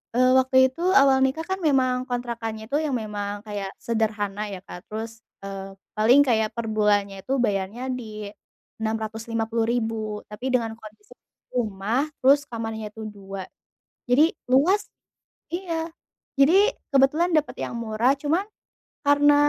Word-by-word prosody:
eee, 255 +1 +5
waktu 260 0 +2
itu 260 +6 -10 0.2
awal 270 -1 +5
nikah 270 +5 -1
kan 380 - 0
memang 265 -5 +3 0.2
kontrakannya 235 -3 -4
itu 285 - +1
yang 290 - -1
memang 205 -1 -4
kayak 205 -2 -4 0.2
sederhana 215 -3 -1
ya, - - -5
Kak, - - -8
terus, 225 +1 -6 0.2
eee, 195 0 -6 0.2
paling 230 +6 +6
kayak 220 -3 +2
per 235 - -2
bulannya 205 -2 +1
itu 260 - -3
bayarnya 200 +2 -2 0.2
di 215 -3 -7 0.6
Rp650.000 225 +1 -1 0.3
tapi 225 +5 -4
dengan 230 -3 +1
kondisi 225 - -14 0.4
rumah 230 +4 -1
terus 275 +2 +5
kamarnya 225 -2 -4
itu 220 +1 -11
2, 195 -2 -7 0.6
jadi 300 +7 +4 0.2
luas 340 +11 +3 0.6
iya 335 -2 -3 0.5
jadi 285 +5 +6 0.4
kebetulan 280 +6 +4
dapat 305 -1 0
yang - - -6
murah 225 +3 +2
cuman 325 +6 +1 0.6
karena 290 0 +5
230 Hz, 130 wpm, -24 LUFS, 215-270 Hz, 0.6 s, paling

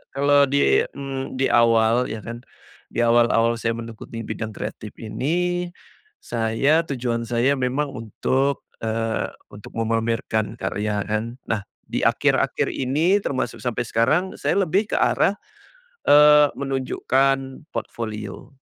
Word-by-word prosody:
kalau 140 0 +4
di, 140 +1 +3
mmm, 135 -1 -5
di 135 -1 +1
awal, 115 +1 +4
iya 110 -1 -6
kan, 115 +1 -7 0.5
di 120 - -1
awal-awal 115 0 +3
saya 115 +1 -1
mengikuti 115 0 -7
bidang 110 0 -5
kreatif 105 0 -7
ini, 175 +10 -1 0.6
saya, 125 +8 +1
tujuan 120 -3 -2
saya 120 +3 +2
memang 135 +3 -1
untuk, 130 +4 -1 0.2
eee, 115 0 -1 0.2
untuk 105 +2 -12
memamerkan 115 -1 -1
karya, 105 -1 -2
kan. 110 +3 -3
Nah, 105 -3 -1 0.2
di - - -2
akhir-akhir - - +2
ini, 150 +9 +1
termasuk 130 -2 -2
sampai 120 -1 -1
sekarang, 150 +13 +1
saya - - 0
lebih 195 +3 +1
ke - - +1
arah, 200 - +2 0.7
eee, 150 0 +7
menunjukkan 135 0 0
portfolio. 110 +3 -6
120 Hz, 120 wpm, -23 LUFS, 115-140 Hz, 0.7 s, eee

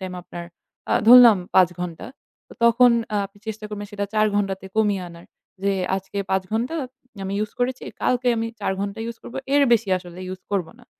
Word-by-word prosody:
Time 185 -1 -6
আপনার 175 0 -8 0.5
আ - - +3 0.2
ধরলাম 240 -4 +9 0.2
৫ 185 -3 +7
ঘণ্টা। 170 -2 -5 0.4
তো - - -13
তখন 235 +2 +6 0.2
আ - - +2
আপনি 200 +1 -24
চেষ্টা 220 0 -6
করবেন 205 -1 -6
সেটা 205 0 -2
৪ 215 0 +4
ঘণ্টাতে 195 -1 -2
কমিয়ে 205 -3 +2
আনার। 170 0 -13 0.4
যে 200 - +2 0.2
আজকে 195 +1 -6
৫ 190 0 +2
ঘণ্টা 240 +8 -1 0.5
আমি 195 - -3
ইউস 215 0 -3
করেছি, 250 +1 -1 0.2
কালকে 250 0 +1
আমি 225 - -1
৪ 200 - 0
ঘণ্টা 200 +2 -4
ইউস 235 - -6
করব, - - -11 0.2
এর 285 - +5
বেশি 225 -3 +2
আসলে 180 0 -11
ইউস 185 0 -7
করব 190 -4 0
না। - - -19
205 Hz, 195 wpm, -23 LUFS, 190-230 Hz, 0.5 s, ধরলাম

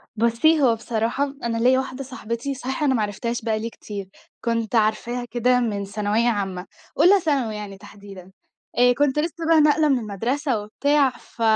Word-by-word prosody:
بُصّي، 235 +8 +3
هو 235 -4 +4
بصراحة 235 +5 -2
أنا 230 -1 -1
ليّا 255 +3 +4
واحدة 265 0 -5
صاحبتي 245 +1 -5
صحيح 265 +3 -4
أنا 270 -3 +3
ما 220 - +1
عرفتهاش 230 +4 -3
بقى 220 -1 -1
لي 230 +1 -4
كتير، 200 -4 -8 0.4
كنت 230 0 -1
عارفاها 230 +3 0
كده 250 +1 +2
من 205 -4 -2
ثانوية 210 +4 0
عامة 195 -4 -3 0.3
أولى 370 +6 +6
ثانوي 270 -10 0
يعني 205 -2 -7
تحديدًا 195 -2 -13 0.5
آآ، 245 0 +5
كنت 285 +1 +1
لسه 330 +1 -3
بقى 320 -2 +6
ناقلة 300 0 +4
من 265 - +3
المدرسة 235 +4 -2
وبتاع 280 +6 +2
ف 240 -1 -15
235 Hz, 170 wpm, -23 LUFS, 215-275 Hz, 0.5 s, أولى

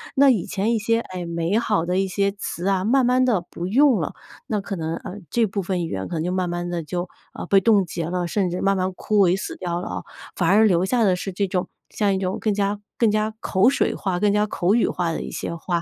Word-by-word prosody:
那 275 0 +6
以 215 -9 +2
前 210 +3 -1
一 225 - +1
些， 230 +2 +1
哎， 185 -5 -6
美 170 +4 -1
好 210 -7 0
的 180 +1 0
一 195 0 +1
些 200 +1 0
词 195 -2 -5
啊， 190 -1 +1
慢 255 +2 +3
慢 255 +1 +3
地 220 -8 +2
不 175 +1 -5
用 255 0 +4
了， 155 - -3 0.3
那 210 -2 -1
可 195 -1 -5
能， 160 0 -2
呃， 185 - -8
这 235 -2 +2
部 200 0 -3
分 180 -2 -2
语 - - -6
言 95 0 -4
可 170 - -5
能 160 - -1
就 180 - -1
慢 185 -1 -1
慢 175 0 -3
地 175 -1 -2
就， 175 +4 -4 0.2
呃， - - -6
被 195 +1 +5
冻 205 -1 +4
结 170 -1 -4
了， 180 +1 -2
甚 190 0 0
至 180 - -3
慢 195 0 +2
慢 185 +1 0
枯 210 +3 -1
萎 180 - +3
死 - - -5
掉 175 -1 -3
了 - - -6
啊。 - - -5 0.3
反 175 - 0
而 215 +3 +6
留 180 -3 +3
下 235 +2 +2
的 185 -3 +3
是 195 +2 -5
这 200 +2 -1
种 180 -1 -1 0.2
像 205 -2 +1
一 - - 0
种 190 0 -2
更 215 - 0
加 200 0 -1 0.2
更 230 -3 +3
加 215 +1 0
口 195 +5 +3
水 275 - 0
化、 185 -3 -2
更 205 +1 +3
加 210 0 +3
口 195 -1 +1
语 235 - +3
化 170 -2 -1
的 - - -3
一 - - -6
些 170 - -4
话。 170 0 -2
190 Hz, 290 characters per minute, -23 LUFS, 175-210 Hz, 0.3 s, 那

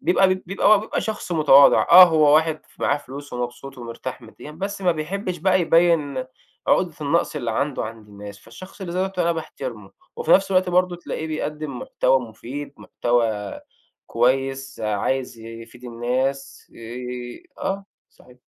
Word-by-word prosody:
بيبقى 190 +1 +3
بيبقى 195 +3 +2
بيبقى 215 - -3
شخص 215 -4 -4
متواضع، 145 -4 +6
آه، 180 +2 +11
هو 155 -3 +4
واحد 160 0 +2 0.2
معاه 140 - +2
فلوس، 140 +1 -10
ومبسوط، 125 +2 -6
ومرتاح 120 +2 -7
ماديًا، 115 +6 -12
بس 195 +5 -5
ما 180 -2 +3
بيحبش 180 +4 -4
بقى 185 +2 +2
يبين 165 -6 +2 0.4
عقدة 175 -4 +2
النقص 155 +1 0
اللي 120 -5 -2
عنده 140 +3 -1
عند 110 -1 -9
الناس. 100 0 -10
فالشخص 185 - -13
اللي 175 -3 -5
زي - - -1
دوّة 190 0 -1
أنا 170 -1 +2
باحترمه. 165 - -7 0.3
وفي 470 - -3
نفس 195 0 +4
الوقت 185 0 +3
برضه 180 0 +2
تلاقيه 160 -2 -5
بيقدم 150 -3 -4
محتوى 130 +1 +1
مفيد، 125 +5 -8
محتوى 115 -4 -1 0.5
كويس، 135 +2 0
عايز 115 +4 -2
يفيد 115 +2 -11
الناس. 130 +3 -3
آآ 120 +1 -7 0.2
آه، 195 +1 -2 0.3
صحيح. 125 - -20
140 Hz, 150 wpm, -22 LUFS, 120-175 Hz, 0.5 s, آه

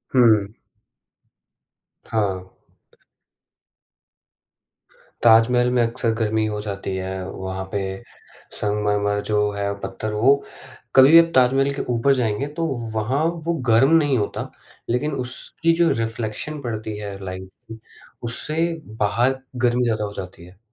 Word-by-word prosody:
हुँ, 125 - +6
हुँ। 105 +2 -5 1.5
हाँ। 100 -4 -1 2.8
ताजमहल 120 +2 +5
में 120 - +3
अक्सर 115 0 -1
गर्मी 110 -1 0
हो 105 -1 -3
जाती 100 -2 -4
है, 95 0 -4
वहाँ 95 0 -5
पे 100 - -1 0.8
संगमरमर 105 0 0
जो 105 -1 +2
है 100 0 -2
पत्थर 110 +1 -5
वो 125 +7 +5 0.6
कभी 135 +2 +8
भी 165 - +10
आप 165 0 +3
ताजमहल 135 +2 +4
के - - -3
ऊपर 130 +4 +3
जाएँगे, 120 +1 -1
तो 165 +3 -3 0.3
वहाँ 130 +8 0 0.2
वो 170 - +1 0.2
गर्म 120 +7 +5
नहीं 145 -5 +2
होता। 105 - -3 0.4
लेकिन 125 +6 0
उसकी 165 +6 -1
जो 170 0 +3
रिफ्लेक्शन 115 +6 -4
पड़ती 110 -4 -4
है 100 -1 -6
लाइट 95 0 -7 0.2
की, 110 - -8 0.4
उससे 155 +8 -1 0.3
बाहर 120 +6 +1 0.3
गर्मी 120 +1 +2
ज़्यादा 110 -2 0
हो 100 - -7
जाती 90 -2 -8
है। 90 +1 -17
110 Hz, 130 wpm, -22 LUFS, 105-130 Hz, 2.8 s, भी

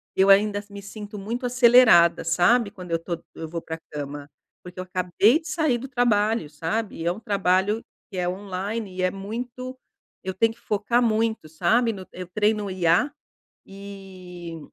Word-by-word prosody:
eu 190 +1 +4
ainda 205 +1 +4
me 200 0 -9
sinto 210 +1 -9
muito 230 +6 -4
acelerada, 240 -7 +6
sabe? 200 +7 +3
Quando 180 -3 -10
eu 165 - +1
tô 170 0 -4
quando 170 - -26
eu 160 - -6
vou 170 0 -4
pra 160 0 -6
cama, 145 0 -6 0.3
porque 180 0 -10
eu - - -2
acabei 185 - +2
de 320 - -12
sair 310 -8 +1
do 265 - -7
trabalho, 225 - +1
sabe? 170 +8 -3
E 165 - -5
é 175 - +3
um 195 - -6
trabalho 200 +1 +1 0.3
que 190 - -7
é 180 0 0
online 195 +2 -4
e - - -1
é 185 - +3
muito 240 +6 -6 0.5
eu 190 - -3
tenho 225 +4 +2
que 235 - -25
focar 225 +3 0
muito, 220 -5 0
sabe? 220 +9 +2
No 190 -2 -9
eu 180 -1 -8
treino 210 +2 0
IA, 185 - +2 0.6
e 185 -4 -10
200 Hz, 180 wpm, -24 LUFS, 180-225 Hz, 0.6 s, acelerada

